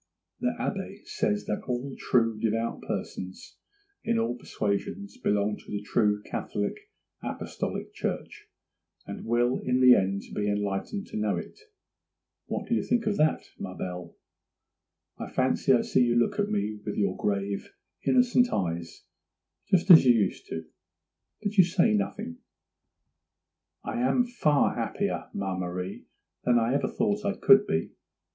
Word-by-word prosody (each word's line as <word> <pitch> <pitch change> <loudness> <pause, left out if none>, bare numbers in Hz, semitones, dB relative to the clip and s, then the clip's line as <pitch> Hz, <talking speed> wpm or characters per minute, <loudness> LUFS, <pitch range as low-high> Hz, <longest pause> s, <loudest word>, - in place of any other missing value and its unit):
The - - 0
Abbé - - -4
says 105 0 -1
that 105 - -2
all 130 +2 -3
true, 115 -3 +1
devout 115 +1 -1
persons 95 0 -6 0.5
in 115 - +1
all 115 +2 0
persuasions 125 - -3
belong 105 - 0
to - - -16
the 105 0 -3
true 105 -1 +1
Catholic 100 0 -3 0.5
Apostolic - - -4
Church, - - -4 0.6
and - - -7
will 120 +2 +2
in 125 0 0
the 130 -1 +8
end 100 -2 +1
be 105 0 -1
enlightened 105 - -2
to - - -7
know 105 -1 0
it; 205 - -6 0.9
what - - -3
do - - 0
you - - +2
think 240 -1 0
of 210 -1 0
that, 155 +1 +2 0.2
ma - - -6
belle? 90 -1 -6 1.0
I - - -5
fancy 130 +1 +1
I 125 - +5
see - - +2
you 120 -1 +2
look 120 - +2
at 205 0 +1
me 110 - -1
with 105 - -4
your 100 -3 +1
grave, 100 -1 -2 0.3
innocent 250 -1 +4
eyes, 85 -3 -3 0.7
just 190 -1 +4
as 165 - +11
you 125 -2 +6
used 100 -4 0
to; 80 0 -5 0.8
but 205 0 -2
you - - +11
say 185 +5 +3
nothing. 220 +4 -2 1.4
'I 240 - -3
am 250 -1 +3
far 155 - +2
happier, - - -2
ma 95 -1 -2
Marie, 90 +1 -5 0.4
than 120 -1 +4
I 115 +2 +2
ever 140 - +1
thought 210 -1 0
I 200 0 0
could 205 +1 +6
be. 80 - -1
120 Hz, 150 wpm, -28 LUFS, -, 1.4 s, as